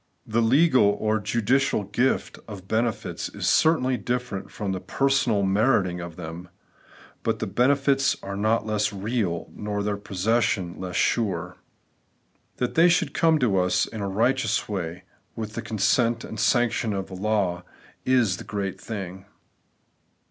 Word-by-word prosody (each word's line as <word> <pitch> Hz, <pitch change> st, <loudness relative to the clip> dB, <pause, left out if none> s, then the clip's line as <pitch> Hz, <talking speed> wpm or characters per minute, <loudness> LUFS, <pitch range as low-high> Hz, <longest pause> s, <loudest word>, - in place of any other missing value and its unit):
The 115 Hz, +1 st, +1 dB
legal 125 Hz, -4 st, +4 dB
or 110 Hz, 0 st, +1 dB
judicial 115 Hz, +2 st, +1 dB
gift 120 Hz, +7 st, -1 dB
of 100 Hz, -4 st, -9 dB
benefits 110 Hz, +1 st, -1 dB
is -, -, -5 dB
certainly 130 Hz, -6 st, +3 dB
different 120 Hz, -2 st, -3 dB
from 100 Hz, -2 st, -4 dB
the 95 Hz, -, -2 dB
personal 135 Hz, -4 st, +1 dB
meriting 95 Hz, -3 st, +2 dB
of 85 Hz, -1 st, -7 dB
them; 85 Hz, +1 st, -8 dB, 0.7 s
but 115 Hz, -1 st, 0 dB
the 110 Hz, -, -3 dB
benefits 135 Hz, +5 st, +2 dB
are 100 Hz, 0 st, -5 dB
not 110 Hz, +2 st, +1 dB
less 105 Hz, 0 st, 0 dB
real, 100 Hz, -4 st, -2 dB
nor 105 Hz, -1 st, -3 dB
their 100 Hz, 0 st, -1 dB
possession 100 Hz, -2 st, 0 dB
less 90 Hz, -1 st, -5 dB
sure. 90 Hz, -6 st, 0 dB, 1.0 s
That 125 Hz, -, -1 dB
they 170 Hz, +2 st, +5 dB
should 170 Hz, -4 st, +1 dB
come 165 Hz, -1 st, +3 dB
to 100 Hz, -6 st, +3 dB
us 90 Hz, 0 st, +2 dB
in 110 Hz, -, -7 dB
a 100 Hz, -, -2 dB
righteous 115 Hz, +2 st, +1 dB
way, 90 Hz, -3 st, -4 dB, 0.3 s
with 110 Hz, -1 st, -5 dB
the 115 Hz, -, -4 dB
consent 115 Hz, +2 st, +1 dB
and 110 Hz, -, -7 dB
sanction 120 Hz, -1 st, +2 dB
of 95 Hz, -1 st, -4 dB
law, 95 Hz, -2 st, -1 dB, 0.4 s
is 120 Hz, -8 st, +2 dB
the -, -, -8 dB
great 100 Hz, -2 st, -4 dB
thing. 95 Hz, -3 st, -6 dB
110 Hz, 145 wpm, -25 LUFS, 95-120 Hz, 1.0 s, they